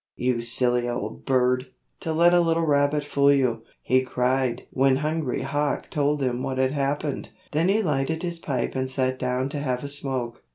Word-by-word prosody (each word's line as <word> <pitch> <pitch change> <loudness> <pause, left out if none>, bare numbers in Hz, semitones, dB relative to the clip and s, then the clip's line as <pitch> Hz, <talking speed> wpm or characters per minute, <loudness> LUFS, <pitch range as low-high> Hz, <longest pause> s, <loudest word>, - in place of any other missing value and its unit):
"You 125 -1 0
silly 120 0 +2
old 120 +1 -5
bird, 125 -1 +2 0.3
to 160 - -3
let 170 +2 +4
a 175 - +6
little 165 -1 +2
rabbit 145 0 +2
fool 140 -1 +3
you," 125 -5 +1 0.2
he 130 0 +3
cried 130 0 0
when 135 0 +3
Hungry 150 -2 -1
Hawk 145 +1 -2
told 145 -1 +1
him 125 -1 -1
what 130 0 -3
had 130 0 +2
happened. 145 0 -2 0.2
Then 160 +5 +1
he 215 +3 +2
lighted 155 +1 -1
his 175 -1 -3
pipe 130 -7 -2
and 130 0 -2
sat 130 -1 0
down 125 +1 -1
to 145 0 -4
have 130 -3 -2
a - - -4
smoke. 135 -4 -3
135 Hz, 190 wpm, -25 LUFS, 125-150 Hz, 0.3 s, a